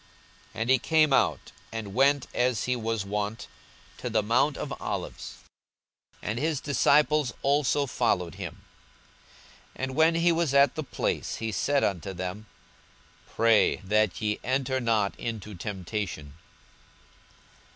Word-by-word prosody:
42:022:039 - - -4
And 115 - -1
he 130 - +5
came 155 +1 +3
out, - - +1 0.2
and 110 -3 -5
went, 140 +3 +3
as 125 -3 +1
he 125 - 0
was 115 -3 -2
wont, 105 +2 -3 0.5
to 125 - -4
the 110 -2 +1
mount 120 +7 +2
of - - -4
Olives; - - -5 0.9
and 110 +3 -2
his 155 0 0
disciples 145 0 +2
also 145 0 +2
followed 90 - 0
him. - - -8 1.1
42:022:040 - - -6
And 130 0 -2
when 160 +2 +4
he 170 +1 +3
was 165 -4 0
at 140 -2 +5
the 155 - -4
place, - - -2
he 115 -1 -3
said 140 +8 +1
unto 95 0 -1
them, 95 +4 -6 0.8
Pray 115 -2 +3
that 105 0 +1
ye 105 -1 -1
enter 130 +1 0
not 110 -4 +1
into 110 -2 -5
temptation. 90 -5 -5
115 Hz, 140 wpm, -27 LUFS, 105-140 Hz, 1.1 s, he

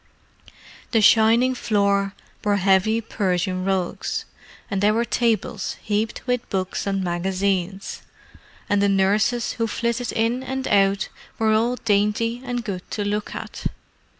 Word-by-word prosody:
The 225 - +4
shining 230 +4 +5
floor 200 -4 +1 0.3
bore 205 -1 +2
heavy 195 +3 +3
Persian 185 -4 -1
rugs, 190 -2 -1 0.5
and 195 -1 0
there 210 +1 +4
were 235 +1 +1
tables 235 -2 -1
heaped 215 +1 -2
with 250 -1 -1
books 190 +1 -2
and 195 -1 0
magazines; 190 +2 -1 0.7
and 205 0 +2
the 200 - +3
nurses 200 +5 +2
who 230 -1 -1
flitted 235 +2 -1
in 230 +3 +1
and 265 0 -3
out 195 -1 +3 0.3
were 220 -1 +2
all 230 +3 +2
dainty 225 +2 +1
and 245 -2 -3
good 185 -4 -5
to 205 - -3
look 210 +1 -2
at. - - -4
210 Hz, 135 wpm, -23 LUFS, 195-230 Hz, 0.7 s, shining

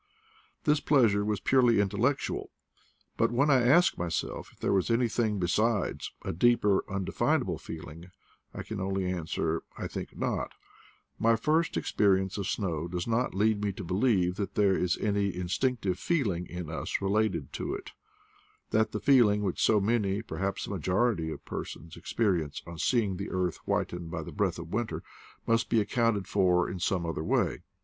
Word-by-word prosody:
This 150 -2 +3
pleasure 115 -10 +3
was 105 -1 -1
purely 125 -4 +4
intellectual; 110 +8 0 0.7
but 115 - +2
when 140 +5 +3
I 130 -2 +5
ask 145 +9 +4
myself 85 -1 -3
if - - -26
there - - 0
was 95 +2 +1
anything 115 -2 +1
be 90 - 0
sides, 110 +2 0
a - - -2
deeper, 105 +1 +3
undefinable 95 -1 0
feeling, 80 +2 -9 0.4
I - - -6
can 110 - -6
only 95 0 -1
answer, 85 -2 -1 0.2
I - - -4
think - - -7
not: - - -2 0.7
my 115 +1 +4
first 155 +8 +1
experience 95 -1 +1
of 100 - -2
snow 85 -7 -2
does 85 0 -3
not 115 -2 0
lead 105 +1 +2
me 100 - +1
to 95 - -7
believe 90 -1 +1
that 100 -1 -3
there 100 -2 +4
is 90 0 0
any 100 -2 0
instinctive 95 +2 -1
feeling 100 - 0
in 90 -2 -6
us 80 - -2
related 105 +2 0
to 380 - -3
it; 400 -1 -8 0.8
that 110 0 +2
the - - -1
feeling 115 -7 +4
which 95 -3 -2
so 110 - +4
many, 105 -1 0
perhaps 100 -3 -3
a - - -7
majority 95 -1 0
of - - -7
per - - -4
sons, 85 - -10
experience 90 -10 -1
on 85 -1 -9
seeing 105 -5 +1
the 100 - -5
earth 90 -2 -1
whitened 85 -1 -2
by 80 -1 -4
the - - -8
breath 95 -4 0
of 85 0 -8
winter, 115 0 -2 0.4
must 115 0 +1
be 115 - +3
accounted 110 -2 +1
for 90 -3 +3
in 90 - -5
some 90 -1 0
other 80 -1 -3
way. - - +1
100 Hz, 170 wpm, -29 LUFS, 90-115 Hz, 0.8 s, I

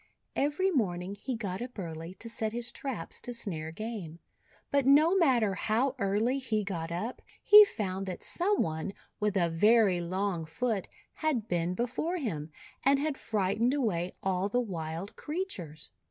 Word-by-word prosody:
Every 300 +7 +1
morn 185 - 0
ing 190 +2 -5
he 250 +5 -4
got 200 -3 -4
up 245 0 -7
early 165 -1 -6
to 230 - -8
set 225 -1 -1
his 240 0 -3
traps 255 -12 -5
to 245 - -5
snare 160 -9 -3
game. 200 -4 -6 0.5
But 280 -1 +3
no 305 +6 +6
matter 250 - +4
how 230 +8 +1
early 215 +7 +1
he 220 -5 -1
got 170 -4 -4
up, 215 +9 -3 0.2
he 420 +1 +11
found 195 - -3
that 185 - -5
some 395 +4 +2
one 160 +4 -3 0.3
with 210 -1 +1
a 175 -2 +3
very 195 +2 +4
long 185 -1 -1
foot 210 +5 -1 0.3
had 275 -9 -1
been 175 -1 0
be 240 - +1
fore 325 +8 -2
him, 165 - -3 0.3
and 275 +2 +5
had 295 +1 -1
frightened 220 +4 +1
away 185 -10 0
all 190 +1 0
the 245 - +1
wild 170 -4 -4
creatures. 185 - -5
210 Hz, 170 wpm, -30 LUFS, 180-255 Hz, 0.5 s, he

